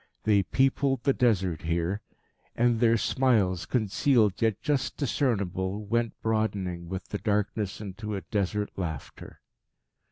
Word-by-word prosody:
They 105 -2 +4
peopled 135 +4 +1
the 135 - +3
Desert 95 - +1
here. 85 +5 -1 0.5
And 120 -1 +2
their 115 -1 +4
smiles, 105 -10 +1
concealed 110 -2 +2
yet 110 -3 +2
just 140 -3 -1
discernible, 105 - -1
went 115 +2 -1
broadening 100 -6 -1
with 95 0 -5
the 105 - -3
darkness 105 -1 -1
into 105 +1 -5
a 95 - -3
Desert 105 +3 -2
laughter. 80 -6 -6
105 Hz, 125 wpm, -28 LUFS, 95-115 Hz, 0.5 s, They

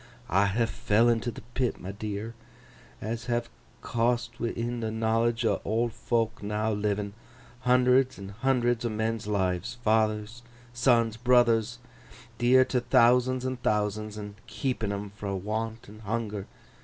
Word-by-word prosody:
'I 100 +3 +4
ha' 115 +4 +1
fell 115 +1 +2
into 120 +1 +1
th' - - -11
pit, 125 -1 -1
my 95 - -6
dear, 105 +2 -5 0.7
as 115 +2 -4
have 120 -1 -1 0.3
cost 120 0 0
wi'in 120 +1 -2
the 110 -1 -2
knowledge 115 +1 +1
o' 105 -3 +1
old 115 +3 0
fok 115 0 -1
now 105 +1 -1
livin, 105 -1 -1 0.5
hundreds 125 +1 +3
and 100 0 -8
hundreds 120 +1 +1
o' 120 - 0
men's 110 0 -2
lives—fathers, 110 +3 0 0.3
sons, 120 -2 +3
brothers, 120 -1 +3 0.6
dear 130 +2 +5
to 125 - 0
thousands 125 +1 +3
an' 130 0 -2
thousands, 105 -1 -1
an' 105 -1 -7
keeping 120 -3 -2
'em 100 0 -4
fro' 100 -1 -4
want 110 +4 -4
and 105 +2 -13
hunger. 105 -2 -3
115 Hz, 140 wpm, -28 LUFS, 105-120 Hz, 0.7 s, dear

